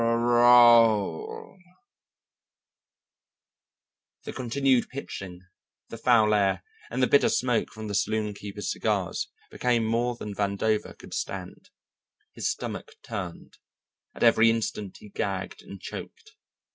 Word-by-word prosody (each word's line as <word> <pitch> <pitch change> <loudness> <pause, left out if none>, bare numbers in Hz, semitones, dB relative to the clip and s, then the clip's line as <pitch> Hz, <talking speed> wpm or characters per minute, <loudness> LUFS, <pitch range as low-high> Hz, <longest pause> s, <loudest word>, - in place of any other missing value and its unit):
The 120 - +4 2.8
continued 130 0 +1
pitching, 95 -9 -7 0.5
the 115 - -7
foul 110 -3 +4
air, 100 -2 +1 0.3
and 130 - -1
the - - +4
bitter 140 - +4
smoke 125 -2 0
from 110 -1 -8
the 105 - -4
saloonkeepers' 105 -1 -2
cigars - - -1 0.2
became 120 -2 +1
more 120 +2 0
than 105 -3 -7
Vandover 100 +2 -1
could - - -12
stand. - - -6 0.6
His - - -2
stomach - - -5
turned, 90 -3 -7 0.6
at - - -3
every 115 -1 +6
instant 105 -3 -2
he 105 - -14
gagged 95 -1 -4
and 100 - -11
choked. 455 -2 -9
115 Hz, 110 wpm, -26 LUFS, 105-120 Hz, 2.8 s, every